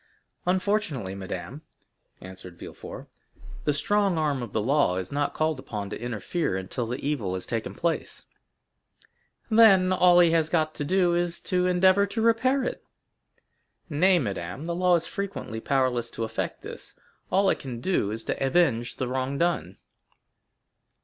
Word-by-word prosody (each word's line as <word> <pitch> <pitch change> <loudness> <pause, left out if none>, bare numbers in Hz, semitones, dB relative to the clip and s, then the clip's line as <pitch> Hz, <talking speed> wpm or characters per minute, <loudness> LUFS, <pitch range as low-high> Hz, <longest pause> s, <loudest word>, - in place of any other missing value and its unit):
"Unfortunately, 185 - 0
madame," 95 - -6 0.6
answered 95 -1 -10
Villefort, - - -9 0.6
"the 150 - +3
strong 200 +4 +1
arm 150 -4 0
of 120 -4 -6
the - - 0
law 130 -5 +2
is 95 0 -4
not 145 0 -1
called 155 -3 0
upon 105 -5 -6
to - - -6
interfere 120 - -2
until 105 +6 -4
the 125 +3 -5
evil 110 -11 -1
has 95 - -4
taken 115 -2 -3
place." 170 -1 -2 1.3
"Then 195 -5 +6
all 180 -1 +6
he 170 -2 +6
has 160 -1 +2
got 155 -2 +1
to - - -4
do 180 +3 +2
is 175 0 -1
to 180 -1 0
endeavor 185 +2 +4
to 225 +3 -3
repair 255 +4 +3
it." - - -4 1.1
"Nay, 180 +5 +4
madame, 100 - -4
the 170 - -2
law 180 0 +3
is 170 -1 0
frequently 200 - -5
powerless 125 -2 0
to 115 - -5
effect 110 0 -4
this; - - -10 0.4
all 195 +1 +4
it - - -2
can 125 -4 -6
do 125 - 0
is 110 +2 -3
to - - -2
avenge 130 -5 +2
the 130 - -3
wrong 130 +2 -2
done." 170 - -1
150 Hz, 155 wpm, -26 LUFS, 115-180 Hz, 1.3 s, Then